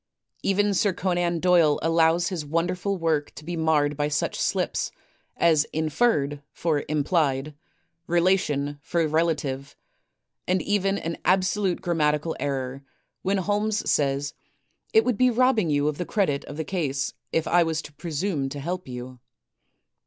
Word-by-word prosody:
Even 205 +1 +2
Sir 200 0 +2
Conan 175 -2 0
Doyle 170 -4 +4
allows 165 +1 +3
his 180 -5 -3
wonderful 180 +6 -1
work 160 -4 0
to 150 - -11
be 175 +1 -3
marred 155 -3 +2
by 145 +1 0
such 150 - -1
slips - - 0 0.5
as 160 -3 +4
inferred 155 -3 0
for 155 -4 -1
implied; 150 -2 +1 0.5
relation 165 -5 +1
for 165 +2 0
relative; 150 -4 -1 0.7
and 185 +1 +2
even 200 -1 +1
an 165 -2 -4
absolute 190 0 +1
grammatical 155 -2 +1
error, 135 -1 -3 0.4
when 195 +1 +1
Holmes 210 +3 0
says, 140 0 +1 0.6
"It 220 +1 +5
would 245 -4 0
be 255 0 +5
robbing 240 -6 +3
you 145 0 +2
of 150 -1 -2
the 180 - -1
credit 165 -10 0
of 145 - -8
the 160 - -3
case 145 -7 -2 0.2
if 165 - +1
I 175 - +4
was 165 -2 0
to 150 - -11
presume 155 -2 -2
to 145 - -6
help 175 +4 -4
you." 125 0 -8
165 Hz, 145 wpm, -25 LUFS, 145-185 Hz, 0.7 s, It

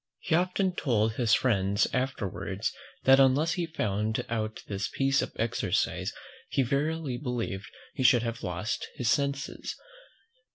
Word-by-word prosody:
He - - -3
often 185 +2 +2
told 110 -8 +1
his 115 -2 +3
friends 100 -5 +2
afterwards, 100 -6 -2 0.3
that 135 +1 +7
unless 140 +5 +4
he 175 - -1
had 160 - -21
found 105 0 0
out 110 -1 -3
this 100 -1 -2
piece 135 0 +2
of - - -3
exercise, 110 -5 0 0.4
he 135 - +2
verily 140 +1 -1
believed 115 -7 -3 0.3
he - - -4
should 125 -2 +5
have 115 0 -3
lost 95 +3 -3
his 120 -3 +1
senses. 140 -1 -1
120 Hz, 140 wpm, -29 LUFS, 105-140 Hz, 0.4 s, that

